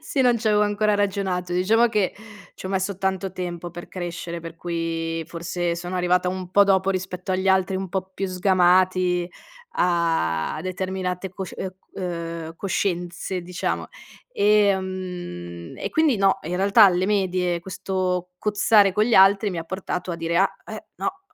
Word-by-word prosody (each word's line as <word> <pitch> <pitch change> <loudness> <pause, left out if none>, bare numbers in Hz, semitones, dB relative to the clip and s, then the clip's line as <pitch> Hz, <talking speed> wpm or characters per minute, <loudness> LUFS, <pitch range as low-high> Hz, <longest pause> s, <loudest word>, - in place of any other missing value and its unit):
sì, 305 -3 -2
non 245 -2 +4
c'avevo 210 -2 +3
ancora 210 0 +2
ragionato; 190 -3 -1
diciamo 220 +7 +3
che, 210 -4 0 0.4
ci - - -8
ho - - -4
messo 190 0 -1
tanto 190 -1 -1
tempo 175 -2 -5
per 175 +1 -9
crescere, 170 -1 -5
per 165 0 -8
cui 165 -1 -3
forse 170 0 -2
sono 175 +2 -5
arrivata 180 0 +2
un 185 -1 -4
po' 200 - +7
dopo, 195 -1 +3
rispetto 185 0 -3
agli 190 +1 0
altri 190 0 +3
un 190 -1 -4
po' 190 +1 -3
più 195 0 -2
sgamati, 180 -1 +3 0.5
a 165 - +1
determinate 185 0 -3
cosci 190 -1 -7
uhm, 190 - -2
c 185 +1 -17
uhm, 170 -2 -4
coscienze, 180 -1 -2
diciamo. 175 0 -3 0.4
Ehm, 185 - 0
e - - -4
quindi 315 -7 +3
no, 195 -1 +3
in 175 +3 -4
realtà 200 +3 +6
alle 185 0 +3
medie 185 -4 +1
questo 185 -1 -2
cozzare 205 -1 +4
con 210 +3 +2
gli 235 - +2
altri 195 +2 +6
mi 175 - -4
ha 165 - -4
portato 180 0 -4
a - - -4
dire: 165 0 -1
"Ah, 195 - +2
eh, - - -8
no, 385 0 -4
185 Hz, 165 wpm, -23 LUFS, 175-195 Hz, 0.5 s, po